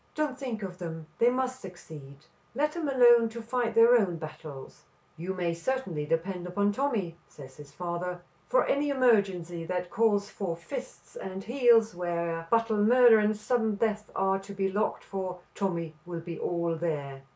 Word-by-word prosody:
"Don't 300 Hz, -4 st, -1 dB
think 250 Hz, -6 st, -5 dB
of 185 Hz, -1 st, -6 dB
them. 165 Hz, -2 st, -6 dB
They 235 Hz, -, +5 dB
must 255 Hz, 0 st, -2 dB
succeed. 155 Hz, -7 st, -11 dB, 0.4 s
Let 300 Hz, +3 st, +1 dB
them 320 Hz, -3 st, -3 dB
alone 240 Hz, -3 st, +6 dB
to 230 Hz, +1 st, -8 dB
fight 235 Hz, 0 st, -1 dB
their 230 Hz, +2 st, +7 dB
own 195 Hz, -7 st, +2 dB
battles." 155 Hz, -3 st, -9 dB, 0.3 s
"You 180 Hz, +4 st, -4 dB
may 175 Hz, -2 st, -1 dB
certainly 170 Hz, -, -2 dB
depend 175 Hz, +3 st, -2 dB
upon 200 Hz, +3 st, +1 dB
Tommy," 205 Hz, -9 st, -1 dB
says 130 Hz, -2 st, -13 dB
his 145 Hz, -1 st, -12 dB
father. 175 Hz, +2 st, -4 dB, 0.3 s
"For -, -, +3 dB
any 290 Hz, +1 st, +1 dB
emergency 200 Hz, -10 st, +2 dB
that 180 Hz, 0 st, -3 dB
calls 205 Hz, -2 st, +2 dB
for 190 Hz, -5 st, -4 dB
fists 255 Hz, +9 st, -8 dB
and 190 Hz, 0 st, -6 dB
heels, 235 Hz, -2 st, +4 dB
where 170 Hz, -1 st, -3 dB
battle, 230 Hz, -1 st, +2 dB
murder 235 Hz, +1 st, +6 dB
and 210 Hz, 0 st, +1 dB
sudden 220 Hz, 0 st, 0 dB
death 210 Hz, 0 st, -1 dB
are 195 Hz, 0 st, +1 dB
to 200 Hz, +1 st, -10 dB
be 195 Hz, -1 st, 0 dB
looked 210 Hz, +2 st, -1 dB
for, 190 Hz, -2 st, -4 dB, 0.2 s
Tommy 170 Hz, -5 st, -2 dB
will 170 Hz, -2 st, -5 dB
be 165 Hz, -1 st, -7 dB
all 170 Hz, -1 st, -1 dB
there." 145 Hz, -5 st, -3 dB
195 Hz, 170 wpm, -29 LUFS, 170-230 Hz, 0.4 s, their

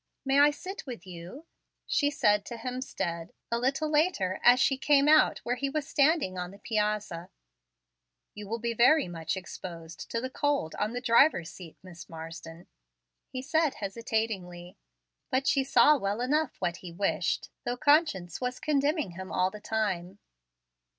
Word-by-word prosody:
May 270 Hz, +1 st, +3 dB
I 290 Hz, +1 st, +7 dB
sit 370 Hz, +4 st, -7 dB
with 235 Hz, -8 st, -7 dB
you?" 180 Hz, -, -10 dB, 0.4 s
she 290 Hz, -, +1 dB
said 210 Hz, -8 st, +2 dB
to 235 Hz, -, -6 dB
Hemstead, 225 Hz, -9 st, -4 dB, 0.2 s
a 235 Hz, -, +1 dB
little 275 Hz, +5 st, 0 dB
later, 295 Hz, -, +1 dB
as 245 Hz, +1 st, +7 dB
she 270 Hz, -, +3 dB
came 280 Hz, +1 st, +3 dB
out 310 Hz, 0 st, +5 dB
where 245 Hz, +1 st, -1 dB
he 275 Hz, +2 st, -1 dB
was 295 Hz, 0 st, -3 dB
standing 280 Hz, -, +2 dB
on 180 Hz, 0 st, -4 dB
the 200 Hz, -, -13 dB
piazza, 210 Hz, -5 st, -2 dB, 1.0 s
"You 210 Hz, -1 st, -9 dB
will 230 Hz, +3 st, -2 dB
be 235 Hz, 0 st, -2 dB
very 245 Hz, +3 st, +4 dB
much 165 Hz, +1 st, -4 dB
exposed 170 Hz, -2 st, -8 dB
to 230 Hz, -, -1 dB
the 260 Hz, +2 st, -5 dB
cold 285 Hz, -, 0 dB
on 210 Hz, +2 st, -1 dB
the 245 Hz, -, -3 dB
driver's 230 Hz, -, +4 dB
seat, 170 Hz, -4 st, -12 dB
Miss 175 Hz, -3 st, -12 dB
Marsden," 165 Hz, +1 st, -9 dB, 0.6 s
he 255 Hz, 0 st, -6 dB
said, 315 Hz, 0 st, +1 dB
hesitatingly; 195 Hz, -5 st, -3 dB, 0.5 s
but 265 Hz, +1 st, 0 dB
she 280 Hz, -3 st, +3 dB
saw 290 Hz, +2 st, +5 dB
well 200 Hz, +1 st, -2 dB
enough 290 Hz, +3 st, 0 dB
what 175 Hz, -1 st, -2 dB
he 180 Hz, -, -9 dB
wished, 175 Hz, -1 st, -1 dB
though 245 Hz, +1 st, -2 dB
conscience 285 Hz, -, +2 dB
was 250 Hz, 0 st, -3 dB
condemning 295 Hz, -, 0 dB
him 185 Hz, +2 st, -8 dB
all 185 Hz, +1 st, +1 dB
the 210 Hz, -, -10 dB
time. 200 Hz, -4 st, -2 dB
230 Hz, 165 wpm, -29 LUFS, 180-275 Hz, 1.0 s, I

